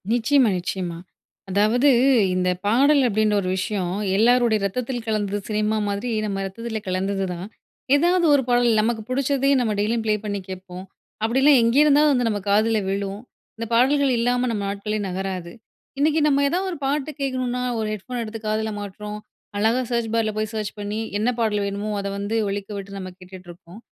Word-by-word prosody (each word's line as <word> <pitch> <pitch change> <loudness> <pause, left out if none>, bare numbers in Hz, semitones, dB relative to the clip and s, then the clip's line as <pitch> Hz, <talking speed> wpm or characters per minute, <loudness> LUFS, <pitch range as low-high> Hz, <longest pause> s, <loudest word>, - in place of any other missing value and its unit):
நிச்சயமா, 245 +1 +3
நிச்சயமா. 175 -1 -4 0.5
அதாவது 215 +8 +3 0.5
இந்த 180 0 +1 0.2
பாடல் 275 +7 +4
அப்படின்ற 215 -1 +1
ஒரு 185 - -3
விஷயம், 190 -2 -2 0.3
எல்லோருடைய 235 0 +4
ரத்தத்தில் 245 +3 -3
கலந்தது 205 -2 -1
சினிமா 215 0 0
மாதிரி, 200 +4 -2 0.2
நம்ம 195 -2 -2
ரத்தத்தில 220 +3 -5
கலந்தது 195 +1 -1
தான். 175 +2 -7 0.5
ஏதாவது 345 +4 +3
ஒரு 280 -2 +3
பாடல். 240 0 +3
நமக்கு 225 0 -1
புடிச்சதே 275 +1 +1
நம்ம 235 -3 0
டெய்லியும் 225 +2 0
ப்ளே 215 -1 +2
பண்ணி 205 -1 -2
கேட்போம். 185 -1 -8 0.4
அப்டிலாம் 265 +4 +5
எங்கேயிருந்தாலும் 290 +5 +5
வந்து, 245 -3 +1
நம்ம 205 -2 -2
காதில 215 +2 +3
விழும். 195 0 -3 0.4
இந்த 230 +1 -4
பாடல்கள் 270 +3 +3
இல்லாம, 245 +1 +1
நம்ம 210 -3 -2
நாட்களே 210 +2 -3
நகராது. 185 -2 -4 0.5
இன்னைக்கு 305 +2 +3
நம்ம 285 -1 +3
ஏதாவது 375 +5 -1
ஒரு 335 - -8
பாட்டு 290 +2 -1
கேட்கணும்னா, 255 -2 -1 0.2
ஒரு 220 - -1
ஹெட் 205 -3 -7
ஃபோன் 250 -1 -4
எடுத்து 225 0 -7
காதில 215 +1 -1
மாட்டுறோம். 210 +1 -7 0.4
அழகா 225 +5 +2
சர்ச் 235 -2 -1
பார்ல 225 -1 +1
போய் 215 0 -2
சர்ச் 215 -1 -3
பண்ணி, 205 +1 -3 0.2
என்ன 220 +4 +1
பாடல் 210 -2 +1
வேணுமோ, 200 +1 -3
அதை 200 - -3
வந்து 205 +3 -3
ஒலிக்க 200 +1 -4
விட்டு 200 0 -7
நம்ம 185 -1 -6
கேட்டுட்டு 185 0 -12
இருப்போம். 175 +3 -14
215 Hz, 170 wpm, -23 LUFS, 200-250 Hz, 0.5 s, அப்டிலாம்